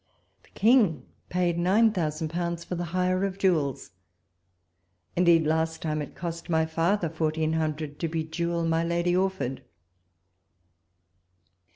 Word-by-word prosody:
The - - -25
King 215 - +4 0.2
paid 175 -1 0
nine 205 +6 +4
thousand 155 -4 -2
pounds 170 0 -3
for - - -6
the 175 0 -2
hire 185 +2 0
of 195 -1 -2
jewels; 155 - 0 1.2
indeed, 170 -2 +4
last 160 +1 0
time, 155 -1 -1
it 145 - -8
cost 170 -1 -6
my 160 -1 +2
father 165 +4 0
fourteen 160 0 -1
hundred 155 -2 -2
to 165 - -1
bejewel 165 +1 -2
my 165 0 +1
Lady 170 +1 +1
Orford. 185 -9 -1
170 Hz, 130 wpm, -27 LUFS, 160-180 Hz, 1.2 s, King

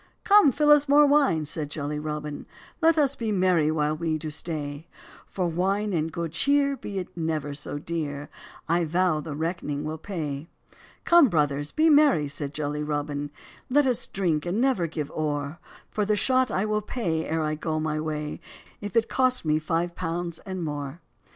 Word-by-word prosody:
"Come 405 -8 +6
fill 295 +2 +3
us 295 -1 +5
more 295 +1 +7
wine," 280 - +3
said 150 0 -3
jolly 150 0 -3
Robin, 150 -1 -5 0.3
"Let 330 0 +4
us 280 -2 +2
be 225 -4 -2
merry 180 -5 +3
while 155 -1 +1
we 160 0 -1
do 155 0 -5
stay; 150 -1 -4 0.4
For 185 - -2
wine 195 +5 0
and 160 -1 0
good 170 -1 -4
cheer, 280 - +2
be 205 -6 -7
it 185 - -5
never 160 -3 -2
so 145 0 -5
dear, 145 -2 -4 0.4
I 170 +1 +2
vow 170 0 +1
I - - -4
the 150 -1 -6
reck'ning 155 -2 -3
will 155 +1 -4
pay. 155 -6 -4 0.6
"Come, 340 -6 +6
'brothers,' 145 -3 0
be 315 +1 +3
merry," 290 - +5
said 140 0 -5
jolly 150 0 -3
Robin, 145 -1 -2 0.4
"Let 290 +2 +4
us 250 -3 +1
drink, 170 -6 0
and 185 +5 0
never 250 -10 +2
give 150 -3 -5
ore; 150 0 -3 0.3
For 210 - 0
the 210 +1 +2
shot 255 +3 +2
I 195 0 0
will 215 0 0
pay, 170 -8 -2
ere 160 0 0
I 155 0 0
go 155 0 -2
my 155 -1 -1
way, 150 -1 -4 0.4
If 205 +2 -6
it 225 0 +3
cost 255 -6 +1
me 155 0 +2
five 170 +2 -1
pounds 170 -1 -4
and 185 -2 -4
more." 145 +1 -5
165 Hz, 185 wpm, -26 LUFS, 150-210 Hz, 0.6 s, more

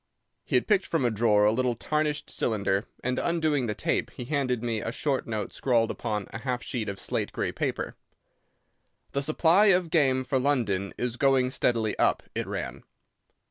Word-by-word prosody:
He - - -2
had 125 - +3
picked 200 -3 +2
from 160 -6 0
a 120 - +2
drawer 105 -1 +3
a 105 - +5
little 125 +1 0
tarnished 150 +4 -1
cylinder, 100 -2 0 0.2
and, 125 0 0
undoing 155 -6 +1
the 105 - -2
tape, - - 0
he 125 - -8
handed 130 -4 -1
me 115 -3 -1
a 115 - -3
short 140 +1 -1
note 110 -2 -3
scrawled 115 -3 +1
upon 105 -4 -3
a 110 - -6
half 125 0 -3
sheet 110 -5 -3
of 100 -1 -5
slate - - -2
grey - - -2
paper. - - -3 1.2
"The 140 - -1
supply 165 +7 +4
of 180 -4 +3
game 135 -5 +3
for 130 +1 0
London 110 -9 0
is 120 -1 -2
going 130 -2 +3
steadily 115 -4 0
up," - - +2
it - - -3
ran. - - -5
125 Hz, 180 wpm, -27 LUFS, 110-145 Hz, 1.2 s, a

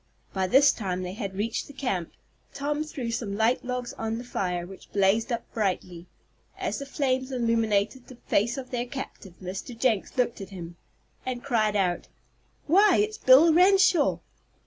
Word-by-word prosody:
By 190 -1 0
this 275 +7 +6
time 185 -4 -3
they 180 0 -5
had 195 -2 -5
reached 220 +3 -2
the 285 - -12
camp. 220 - -3 0.4
Tom 295 +2 -1
threw 260 -6 -5
some 225 -4 -3
light 225 +3 +2
logs 250 -1 -4
on 225 0 -2
the 240 - -6
fire, 180 -7 -2
which 190 +1 -13
blazed 205 +4 +2
up 235 -1 -1
brightly. 180 -4 -2 0.5
As - - -2
the 280 - -6
flames 260 -2 -1
illuminated 230 -1 0
the 255 - -11
face 235 +1 0
of 260 -1 -7
their 245 -1 -2
captive, 240 -8 -8
Mr. 195 +6 -6
Jenks 230 -1 0
looked 240 -4 0
at 195 - -7
him, 175 -3 -8 0.5
and 250 -1 -4
cried 220 -6 +1
out: 180 -3 0 0.6
"Why 385 +4 +5
it's 430 +1 0
Bill 290 +6 +7
Renshaw!" 365 -3 +5
235 Hz, 170 wpm, -27 LUFS, 195-265 Hz, 0.6 s, Bill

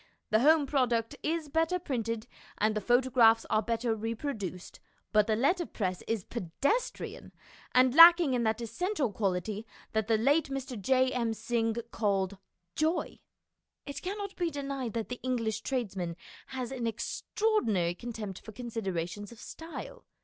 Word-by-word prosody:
The 215 - +5
home 300 +3 +5
product 245 -5 +1
is 320 0 -1
better 325 +4 +1
printed 230 -9 -3 0.3
and 215 +1 +2
the 215 - -2
photographs 240 -1 +4
are 215 - +4
better 230 +1 -1
repro 230 +6 -3
duced, 185 -3 -7 0.3
but 210 -1 +4
the 220 - +2
letterpress 240 - 0
is 225 -4 -1
pedestrian, 240 - -2 0.4
and 255 0 +5
lacking 335 -2 +9
in 245 - +1
that 220 0 0
essential 305 - -1
quality 200 +1 -1 0.3
that 220 -1 0
the 225 -1 +3
late 280 +7 +3
Mr. 270 -1 -4
J. 260 +3 +3
M. 230 -3 -1
Synge 225 0 -1
called 200 -2 0 0.4
"joy." 315 +3 0 0.7
It 280 -1 -6
cannot 400 +1 -4
be 350 -2 0
denied 275 -5 -4
that 225 -2 -3
the 250 - -5
English 230 -4 -1
tradesman 195 -10 -2 0.3
has 255 -2 -5
an 245 -3 -2
extraordinary 225 - 0
contempt 215 -2 -6
for 220 - -10
considerations 205 -4 -4
of 235 - -13
style. 325 +6 -9
235 Hz, 145 wpm, -30 LUFS, 215-275 Hz, 0.7 s, lacking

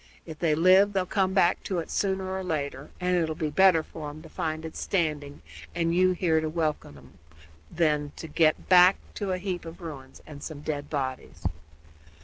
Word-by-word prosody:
If 160 -2 -9
they 160 -3 +2
live 185 +5 +5
they'll 190 -2 +1
come 190 0 0
back 180 -2 +3
to 190 - -2
it 165 - -4
sooner 190 -1 -1
or 190 - -3
later, 145 -5 -3
and 180 0 +1
it 165 -2 +1
'll 160 - -3
be 155 -3 -2
better 175 0 +5
for 155 -1 -8
'em 155 +2 -10
to 160 - -12
find 155 0 -3
it 160 - -8
standing, 150 - -2 0.3
and 170 -1 +1
you 185 +1 +4
here 165 -3 +1
to 155 - -2
welcome 155 - -2
'em, 70 +6 -18 0.5
than 150 -3 0
to 160 - -8
get 155 0 +2
back 180 +1 +7 0.2
to 200 -2 -3
a 185 - 0
heap 185 -1 -4
of 165 +2 -10
ruins 140 -6 -9
and 145 -2 -11
some 150 -2 -7
dead 145 -1 -4
bodies." 130 -3 -4
160 Hz, 200 wpm, -27 LUFS, 150-185 Hz, 0.5 s, back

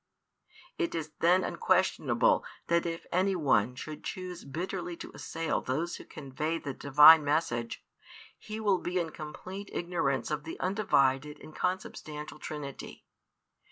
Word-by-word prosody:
It 345 -2 0
is 155 -2 -4
then 180 +2 +4
unquestionable 165 -10 +2 0.3
that 170 0 +2
if 165 0 -5
any 190 +2 +2
one 125 - +2
should 155 +3 -7
choose 180 -1 -6
bitterly 175 +4 -4
to - - -8
assail 165 0 -2
those 160 +7 -2
who - - -11
convey 150 +3 -3
the 145 -4 -5
Divine 150 +4 +8
message, 145 -6 -1 0.5
he 215 +1 -6
will 200 -4 +2
be 180 +1 -2
in 165 -2 -2
complete 185 +6 -8
ignorance 155 -8 -1
of 150 -1 -2
the 160 - -7
Undivided 150 -7 +1
and 155 - -12
Consubstantial 155 -5 -4
Trinity. 150 -3 -7
160 Hz, 135 wpm, -30 LUFS, 145-180 Hz, 0.5 s, Divine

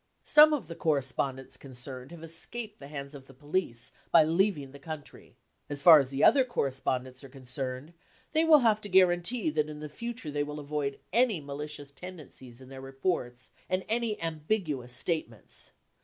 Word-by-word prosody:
Some 305 +1 +8
of 280 - -1
the 165 - -6
correspondents 135 -4 -1
concerned 130 -1 -7
have 170 -1 -11
escaped 210 +7 -2
the 140 - -10
hands 140 -1 -7
of 135 -2 -11
the 135 - -16
police 145 -4 -3 0.2
by 165 - +7
leaving 165 -3 +1
the 140 - -12
country. 155 0 -10 0.3
As 145 -1 -2
far 165 -3 +10
as 135 -2 -1
the 135 +1 -1
other 265 +3 +7
correspondents 130 - -2
are 135 - -11
concerned, 130 +3 -5 0.4
they 315 +1 +3
will 315 -3 +7
have 215 -1 +3
to 205 - -7
guarantee 185 +2 +3
that 150 0 0
in 150 0 -7
future 235 - -6
they 145 0 -1
will 150 +1 -6
avoid 145 -1 -3 0.2
any 230 -5 +3
malicious 145 0 -6
tendencies 140 -7 -11
in 130 - -13
their 135 0 -9
reports 135 -2 -3 0.2
and 185 0 -1
any 225 -1 0
ambiguous 155 - -2
statements. 125 -4 -2
150 Hz, 170 wpm, -29 LUFS, 135-185 Hz, 0.4 s, far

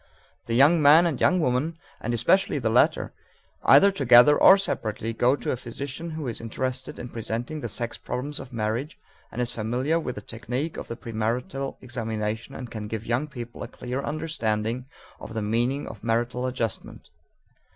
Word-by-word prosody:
The 115 - -1
young 150 +6 +6
man 150 +4 +7
and 160 -7 -1
young 185 - +4
woman, 155 +3 0 0.2
and 120 - -3
especially 145 - +2
the 115 -5 0
latter, 120 - +3 0.5
either 195 +9 +7
together 135 -4 +6
or 190 - +8
separately 115 - -2
go 125 +4 +3
to - - -3
a - - 0
physician 140 +7 -6
who 150 -4 -4
is 115 - -4
interested 130 +3 -4
in 120 - -6
presenting 120 +7 -4
the 120 - -3
sex 120 +2 -3
problems 145 +4 -4
of 130 - -9
marriage 120 - -2 0.3
and - - -6
is 125 -1 0
familiar 125 +8 0
with 125 -6 -4
the 105 - -6
technique 125 +9 -4
of - - -6
the 115 - -5
premarital 120 +5 -3
examination 115 0 -4
and 125 -3 -7
can 105 -2 -5
give 110 +1 -5
young 120 +6 0
people 120 -4 -8
a - - -4
clear 125 +2 -5
understanding 125 -6 -2 0.3
of 115 - -9
the 110 - -1
meaning 120 +6 0
of 110 -2 -10
marital 120 +2 0
adjustment. 120 -4 -4
125 Hz, 175 wpm, -26 LUFS, 115-140 Hz, 0.5 s, or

